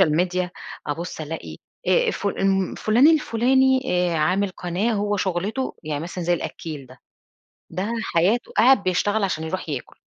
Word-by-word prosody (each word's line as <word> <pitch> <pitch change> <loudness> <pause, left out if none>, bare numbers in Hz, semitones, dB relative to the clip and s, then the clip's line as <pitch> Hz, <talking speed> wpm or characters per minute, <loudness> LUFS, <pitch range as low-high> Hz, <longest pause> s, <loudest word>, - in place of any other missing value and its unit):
الSocial - - +2
Media، 180 0 -2 0.4
أبص 160 +2 -4
ألاقي 160 +1 -6 0.3
آآ، 485 -2 +3
فل 195 -1 0
فلان 235 +7 +4
الفلاني 265 -3 +3 0.3
آآ، - - 0
عامل 185 +6 +1
قناة 180 +5 -2
هو 205 0 0
شغلته 195 +7 -2
يعني 150 -2 -3
مثلًا 175 +1 -5
زي 175 +1 +2
الأكّيل 155 -4 -5
ده، 130 +1 -16 0.7
ده 200 +5 -3
حياته 200 +5 +1
قاعد 245 0 +6
بيشتغل 200 +3 +1
عشان 160 -4 -2
يروح 175 +2 -4
ياكل، 140 -5 -5
190 Hz, 150 wpm, -23 LUFS, 170-220 Hz, 0.7 s, قاعد